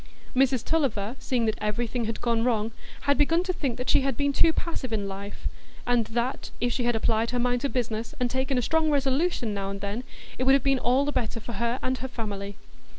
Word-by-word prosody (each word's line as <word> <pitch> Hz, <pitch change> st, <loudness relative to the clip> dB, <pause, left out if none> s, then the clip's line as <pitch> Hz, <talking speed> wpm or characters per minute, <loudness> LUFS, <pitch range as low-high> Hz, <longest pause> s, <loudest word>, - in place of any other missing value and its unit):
Mrs 260 Hz, -2 st, +3 dB
Tulliver, 245 Hz, -8 st, 0 dB
seeing 245 Hz, -3 st, 0 dB
that 220 Hz, -, 0 dB
everything 230 Hz, +3 st, -1 dB
had 225 Hz, 0 st, -3 dB
gone 230 Hz, -1 st, +1 dB
wrong, 225 Hz, -2 st, +1 dB, 0.3 s
had 285 Hz, +1 st, +2 dB
begun 330 Hz, +4 st, +4 dB
to 370 Hz, 0 st, -1 dB
think 265 Hz, -8 st, -2 dB
she -, -, +5 dB
had 270 Hz, -3 st, -1 dB
been 285 Hz, 0 st, +1 dB
too 325 Hz, -, +5 dB
passive 320 Hz, -7 st, -3 dB
in 205 Hz, -3 st, -1 dB
life; 200 Hz, +1 st, -5 dB, 0.4 s
and 245 Hz, -2 st, +3 dB
that, 240 Hz, +3 st, -2 dB
if 245 Hz, 0 st, +1 dB
she 245 Hz, 0 st, -1 dB
had 240 Hz, -1 st, +2 dB
applied 225 Hz, +1 st, +1 dB
her 250 Hz, -, -1 dB
mind 245 Hz, 0 st, +1 dB
to 280 Hz, -, 0 dB
business, 230 Hz, +1 st, -2 dB
and 250 Hz, -, +2 dB
taken 260 Hz, +2 st, 0 dB
a 250 Hz, -, +1 dB
strong 320 Hz, +2 st, +2 dB
resolution 275 Hz, -3 st, +1 dB
now 195 Hz, -1 st, -2 dB
and 200 Hz, 0 st, -4 dB
then, 205 Hz, +5 st, -3 dB, 0.4 s
it 255 Hz, -, +1 dB
would 270 Hz, -, +7 dB
have 275 Hz, -, +2 dB
been 275 Hz, -1 st, +3 dB
all 255 Hz, +4 st, +3 dB
the 290 Hz, -, 0 dB
better 230 Hz, -3 st, -1 dB
for 235 Hz, +2 st, -7 dB
her 235 Hz, +3 st, 0 dB
and 255 Hz, 0 st, 0 dB
her 260 Hz, -, -3 dB
family. 205 Hz, -5 st, -5 dB
245 Hz, 225 wpm, -27 LUFS, 225-270 Hz, 0.4 s, would